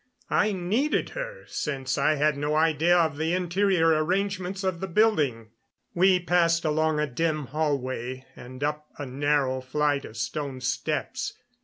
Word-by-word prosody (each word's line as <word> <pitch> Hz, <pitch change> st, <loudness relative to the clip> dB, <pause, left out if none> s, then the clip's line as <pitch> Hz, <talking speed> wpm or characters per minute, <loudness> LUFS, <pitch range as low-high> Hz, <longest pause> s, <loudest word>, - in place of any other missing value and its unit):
I 210 Hz, -, +3 dB
needed 205 Hz, +11 st, 0 dB
her, -, -, -6 dB
since 135 Hz, -3 st, -3 dB
I 155 Hz, -, +2 dB
had 150 Hz, 0 st, +2 dB
no 145 Hz, +2 st, -1 dB
idea 160 Hz, +2 st, +3 dB
of 160 Hz, -4 st, +1 dB
the 160 Hz, +3 st, 0 dB
interior 180 Hz, -1 st, +2 dB
arrangements 190 Hz, +2 st, -1 dB
of 185 Hz, -3 st, -1 dB
the 190 Hz, -, -3 dB
building. 150 Hz, -, +1 dB, 0.4 s
We 185 Hz, +1 st, +4 dB
passed 170 Hz, -1 st, +2 dB
along 155 Hz, 0 st, +1 dB
a 150 Hz, -, +2 dB
dim 155 Hz, +2 st, -1 dB
hallway 130 Hz, -3 st, -2 dB
and 130 Hz, +3 st, -9 dB
up 150 Hz, +1 st, -2 dB
a 145 Hz, -, -5 dB
narrow 135 Hz, 0 st, 0 dB
flight 145 Hz, +2 st, 0 dB
of 110 Hz, -, -10 dB
stone 135 Hz, +2 st, -3 dB
steps. 130 Hz, -, -2 dB
155 Hz, 150 wpm, -26 LUFS, 140-180 Hz, 0.4 s, We